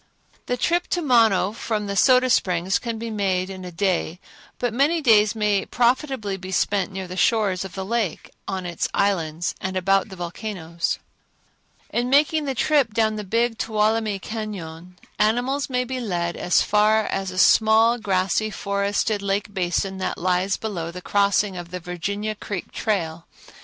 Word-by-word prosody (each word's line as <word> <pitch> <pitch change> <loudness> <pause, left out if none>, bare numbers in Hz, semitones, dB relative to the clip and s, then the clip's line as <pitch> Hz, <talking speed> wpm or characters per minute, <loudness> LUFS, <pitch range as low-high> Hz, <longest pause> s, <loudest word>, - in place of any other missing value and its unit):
The 245 - -1
trip 345 +8 +1
to 355 - -1
Mono 225 -8 +4
from 215 -1 -3
the 200 0 -3
Soda 255 +3 +4
Springs 180 -1 +1
can 230 -2 -4
be 230 0 -5
made 190 -3 -1
in 190 -1 -8
a 180 - -7
day, 180 -2 -1 0.4
but 245 -2 -2
many 290 +7 +2
days 220 -6 +4
may 210 -2 +1
profitably 245 -4 0
be 185 0 -8
spent 195 +1 0
near 190 -1 -5
the 180 - -7
shores 195 -3 +2
of 190 -2 -9
the 190 -1 -4
lake, 220 -5 -2 0.2
out - - -3
on 185 -1 -5
its 175 -1 -2
islands 170 -5 0
and 190 0 -2
about 195 +3 +2
the 190 - -9
volcanoes. 170 -2 -4 0.9
In 240 +1 0
making 300 +2 +3
the 270 -2 -2
trip 270 -4 +2
down 220 -2 +2
the 210 - -4
Big 230 +3 0
Tuolumne 215 -1 0
Cañon, 180 -6 -7 0.3
animals 245 +7 +1
may 250 -1 0
be 255 +1 -4
led 175 -7 -2
as 175 - +2
far 215 +1 +3
as 195 -1 -2
a 185 - -8
small, 220 +4 +5
grassy, 195 +1 0
forested 200 +1 -1
lake 200 +1 -2
basin 190 +1 -1
that 185 - -2
lies 185 +2 0
below 180 -7 -4
the 180 +1 -9
crossing 200 -1 +2
of 175 -1 -7
the 180 +1 -5
Virginia 200 +5 -3
Creek 200 -3 -6
trail. 170 -6 -2
205 Hz, 170 wpm, -23 LUFS, 185-225 Hz, 0.9 s, small